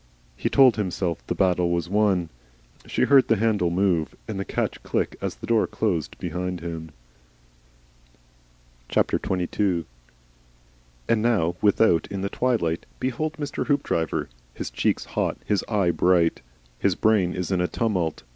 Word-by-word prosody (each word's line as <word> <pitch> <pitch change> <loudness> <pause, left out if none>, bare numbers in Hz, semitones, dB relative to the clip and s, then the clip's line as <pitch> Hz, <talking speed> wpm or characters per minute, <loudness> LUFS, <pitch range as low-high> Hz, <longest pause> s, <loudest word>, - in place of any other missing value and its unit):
He - - -1
told 130 -5 +6
himself 90 -4 -2
that - - -1
his - - -18
battle 90 -2 +2
was 85 0 -1
won. 95 -4 +1 0.6
She - - 0
heard 135 -3 +5
the 115 - +4
handle 105 -5 +1
move 85 -3 +1
and 105 -3 -4
the 95 - -3
catch - - -2
click - - -1
as - - -3
the - - -9
door 115 -2 +2
closed 90 -8 -2
behind 90 +1 -3
him. 80 -1 -6 2.0
XXII. 90 -1 0 1.2
And 115 -2 +2
now 100 -8 +2
without 105 -4 +3
in 100 -1 -5
the 100 - -2
twilight 105 -11 0
behold 130 +5 -2
Mr. 145 -3 -4
Hoopdriver, 140 - 0 0.3
his - - -5
cheeks - - 0
hot, - - -2
his 105 - +1
eye 100 -5 +2
bright! 85 -1 +2 0.4
His 95 -3 +2
brain 100 -5 +2
is 90 0 -3
in 90 -2 +1
a 90 - +1
tumult. 90 -10 -1
95 Hz, 145 wpm, -24 LUFS, 85-110 Hz, 2.0 s, told